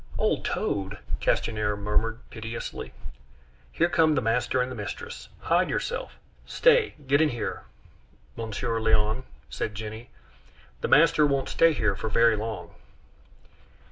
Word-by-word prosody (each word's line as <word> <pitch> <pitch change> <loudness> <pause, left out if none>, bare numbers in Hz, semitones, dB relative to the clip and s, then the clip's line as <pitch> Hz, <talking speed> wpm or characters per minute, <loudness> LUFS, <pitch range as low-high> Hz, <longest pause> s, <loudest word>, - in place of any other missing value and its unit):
"Old - - +1
toad!" 100 +1 -2 0.2
Castanier 105 -2 0
murmured 110 +3 -1
piteously. 115 0 -6 0.8
"Here 170 - +2
come 160 -3 +3
the - - +3
master 120 +2 +1
and 125 0 -1
mistress; 470 - -7
hide - - +2
yourself! 485 - -3 0.3
Stay, 485 -3 +3
get 140 +3 +3
in 160 - +4
here, 120 -3 -4 0.7
Monsieur 115 0 -2
Léon," 110 +3 +2 0.3
said 105 - -3
Jenny. 110 +3 -7 0.7
"The - - 0
master 155 -1 +5
won't 140 -2 0
stay 165 0 +5
here 105 -8 +1
for 110 +4 -4
very 115 +1 +4
long." 110 -3 -5
115 Hz, 125 wpm, -27 LUFS, 110-145 Hz, 0.8 s, master